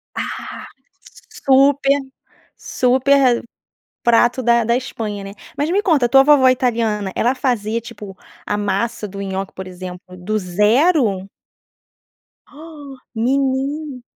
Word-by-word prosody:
Ah, -, -, -6 dB, 0.8 s
super 275 Hz, +1 st, +4 dB, 0.6 s
super 260 Hz, 0 st, +2 dB, 0.6 s
prato 240 Hz, +2 st, +3 dB
da 235 Hz, 0 st, +3 dB
da 235 Hz, +2 st, +1 dB
Espanha, 215 Hz, -6 st, -5 dB
né? 195 Hz, 0 st, -8 dB, 0.2 s
Mas 295 Hz, +3 st, -1 dB
me 405 Hz, +2 st, +2 dB
conta 315 Hz, -, +2 dB
a -, -, 0 dB
tua 270 Hz, +2 st, +6 dB
vovó 275 Hz, -2 st, +5 dB
italiana, 225 Hz, -6 st, 0 dB
ela 245 Hz, +3 st, +1 dB
fazia 230 Hz, -3 st, -1 dB
tipo 210 Hz, -4 st, -10 dB, 0.3 s
a 205 Hz, -, -1 dB
massa 210 Hz, +2 st, -2 dB
do 200 Hz, 0 st, -8 dB
nhoque, 195 Hz, 0 st, -4 dB
por 190 Hz, 0 st, -8 dB
exemplo, 180 Hz, 0 st, -8 dB, 0.2 s
do 215 Hz, +5 st, -2 dB
zero? 210 Hz, -, +2 dB, 1.2 s
Ah, 295 Hz, -2 st, -12 dB, 0.2 s
menina. 270 Hz, +3 st, -1 dB
240 Hz, 120 wpm, -19 LUFS, 205-275 Hz, 1.2 s, tua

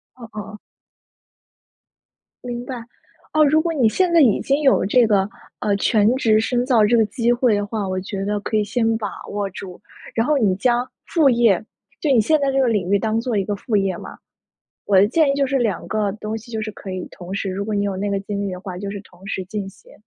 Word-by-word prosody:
嗯 250 Hz, -, -14 dB
嗯 210 Hz, -, -3 dB
嗯。 210 Hz, -, -9 dB, 1.9 s
明 245 Hz, -1 st, -4 dB
白。 260 Hz, -, -5 dB, 0.6 s
哦， 310 Hz, 0 st, +5 dB
如 310 Hz, +2 st, +4 dB
果 335 Hz, 0 st, -1 dB
你 255 Hz, -7 st, +3 dB
现 360 Hz, +8 st, +1 dB
在 335 Hz, -, +6 dB
已 235 Hz, -8 st, +4 dB
经 280 Hz, +2 st, +1 dB
有 270 Hz, -9 st, +3 dB
这 240 Hz, +4 st, +4 dB
个， 200 Hz, -3 st, +2 dB, 0.3 s
呃， 205 Hz, -1 st, +1 dB
全 210 Hz, +2 st, +3 dB
职 225 Hz, -5 st, +3 dB
深 245 Hz, +2 st, 0 dB
造 235 Hz, -5 st, +4 dB
这 235 Hz, +3 st, +3 dB
个 225 Hz, -, +4 dB
机 230 Hz, +3 st, 0 dB
会 240 Hz, -2 st, +3 dB
的 205 Hz, 0 st, -1 dB
话， 205 Hz, -2 st, -3 dB
我 185 Hz, 0 st, -2 dB
觉 195 Hz, 0 st, -5 dB
得 205 Hz, 0 st, -1 dB
可 215 Hz, +1 st, -2 dB
以 210 Hz, -, +2 dB
先 225 Hz, +1 st, 0 dB
把 215 Hz, -2 st, -3 dB, 0.2 s
握 205 Hz, -1 st, -2 dB
住。 180 Hz, 0 st, -9 dB, 0.4 s
然 225 Hz, -, +2 dB
后 300 Hz, 0 st, +2 dB
你 205 Hz, -7 st, +2 dB
将 245 Hz, +4 st, +1 dB, 0.2 s
副 315 Hz, -5 st, +3 dB
业 230 Hz, -6 st, +3 dB, 0.4 s
就 305 Hz, -, -1 dB
你 245 Hz, -, +5 dB
现 310 Hz, +8 st, +2 dB
在 280 Hz, -1 st, +1 dB
这 270 Hz, -, +1 dB
个 265 Hz, -, +3 dB
领 205 Hz, -6 st, 0 dB
域， 200 Hz, -, +5 dB
当 220 Hz, +2 st, 0 dB
做 230 Hz, -2 st, -1 dB
一 195 Hz, -, +1 dB
个 205 Hz, +1 st, -2 dB
副 210 Hz, +2 st, -3 dB
业 195 Hz, -3 st, +1 dB
嘛。 -, -, -10 dB, 0.7 s
我 200 Hz, -, +3 dB
的 190 Hz, +2 st, +6 dB
建 295 Hz, +6 st, +3 dB
议 -, -, +1 dB
就 280 Hz, 0 st, +1 dB
是 270 Hz, +1 st, 0 dB
2 220 Hz, -8 st, -1 dB
个 210 Hz, -2 st, 0 dB
东 215 Hz, +1 st, -5 dB
西， 230 Hz, +2 st, -11 dB
就 220 Hz, -2 st, -3 dB
是 215 Hz, -, -4 dB
可 195 Hz, -, -9 dB
以 185 Hz, -1 st, -5 dB
同 180 Hz, +1 st, -8 dB
时 200 Hz, -1 st, -2 dB
如 195 Hz, +2 st, -3 dB
果 215 Hz, 0 st, -3 dB
你 200 Hz, -, 0 dB
有 200 Hz, -2 st, -2 dB
那 200 Hz, +2 st, -2 dB
个 200 Hz, -, 0 dB
精 200 Hz, 0 st, -4 dB
力 -, -, -3 dB
的 180 Hz, -, -7 dB
话， 185 Hz, -3 st, -7 dB
就 200 Hz, +1 st, -5 dB
是 200 Hz, 0 st, -6 dB
同 185 Hz, -1 st, -17 dB
时 190 Hz, -1 st, -3 dB
进 200 Hz, +1 st, -5 dB
行。 195 Hz, -, -17 dB
215 Hz, 265 characters per minute, -21 LUFS, 200-245 Hz, 1.9 s, 在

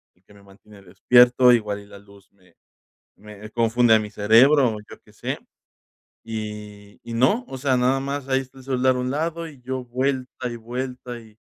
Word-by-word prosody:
el 90 Hz, -, -36 dB
que 105 Hz, -, -21 dB
me 100 Hz, -, -18 dB
mantiene 100 Hz, +1 st, -18 dB
despierto, 120 Hz, +7 st, +5 dB
igual 105 Hz, -3 st, 0 dB
y -, -, -15 dB
la 100 Hz, -1 st, -13 dB
luz 100 Hz, -1 st, -20 dB
me, 90 Hz, -3 st, -27 dB, 0.6 s
me 105 Hz, 0 st, -12 dB
confunde 115 Hz, 0 st, +3 dB
a -, -, +4 dB
mi 105 Hz, -1 st, -5 dB
cerebro, 120 Hz, +7 st, +5 dB
o -, -, -7 dB
yo -, -, -12 dB
qué -, -, -21 dB
sé. -, -, -4 dB, 0.9 s
Y, 105 Hz, -2 st, -8 dB
y 115 Hz, -, -5 dB
no, 130 Hz, -, +2 dB
o 135 Hz, -, -7 dB
sea, 130 Hz, -1 st, +1 dB
nada 130 Hz, +2 st, +2 dB
más, 140 Hz, 0 st, -4 dB
ahí 135 Hz, 0 st, +2 dB
está 135 Hz, 0 st, -12 dB
el 130 Hz, -, -14 dB
celular 130 Hz, -1 st, +1 dB
a -, -, -3 dB
un 125 Hz, 0 st, -2 dB
lado, 165 Hz, +3 st, -3 dB
y 145 Hz, -5 st, -15 dB
yo 130 Hz, 0 st, -4 dB
vuelta 130 Hz, 0 st, -3 dB
y 120 Hz, -, -6 dB
vuelta, 125 Hz, +1 st, -6 dB
y 110 Hz, -1 st, -19 dB
120 Hz, 205 wpm, -23 LUFS, 105-130 Hz, 0.9 s, despierto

